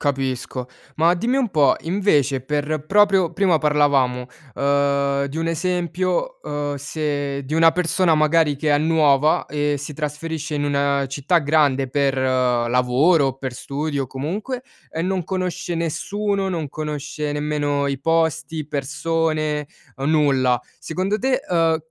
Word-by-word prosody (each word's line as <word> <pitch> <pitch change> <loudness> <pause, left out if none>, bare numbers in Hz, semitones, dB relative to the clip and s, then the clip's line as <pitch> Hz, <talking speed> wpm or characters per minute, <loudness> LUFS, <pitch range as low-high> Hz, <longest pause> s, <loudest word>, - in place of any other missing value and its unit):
Capisco. 130 -2 -2 0.3
Ma 165 +2 +3
dimmi 235 +9 0
un 255 -4 +1
po' 150 -5 +4
invece 155 -7 +1
per 150 +2 -2
proprio 195 -3 +3
prima 180 -2 +2
parlavamo, 140 -5 +2 0.3
ehm, 140 0 +1
di 140 +3 -6
un 165 0 -1
esempio, 180 - -1
uhm, 145 -1 -3
se 145 -1 -3
di 135 - -8
una 165 0 +5
persona 180 -1 +2
magari 155 -1 +3
che 150 +2 -1
è 145 - +4
nuova 155 -2 +3
e 145 -1 -1
si 145 +2 -7
trasferisce 155 +1 -4
in 145 - -1
una 140 -1 +1
città 140 +6 +1
grande 145 -3 +2
per 135 0 +1
lavoro 125 +4 +2
o 135 0 -3
per 130 -2 -4
studio 140 +2 -3
comunque, 200 - -4 0.3
e 165 - -4
non 185 -1 -1
conosce 185 -2 -3
nessuno, 195 +5 -1
non 165 -5 -3
conosce 150 0 -4
nemmeno 145 -1 -1
i 140 -1 -2
posti, 160 0 0
persone, 155 +1 -1 0.3
nulla. 135 -4 +2 0.2
Secondo 190 +6 -2
te, 260 0 +1
uhm, 165 -2 +3
150 Hz, 135 wpm, -21 LUFS, 140-165 Hz, 0.3 s, una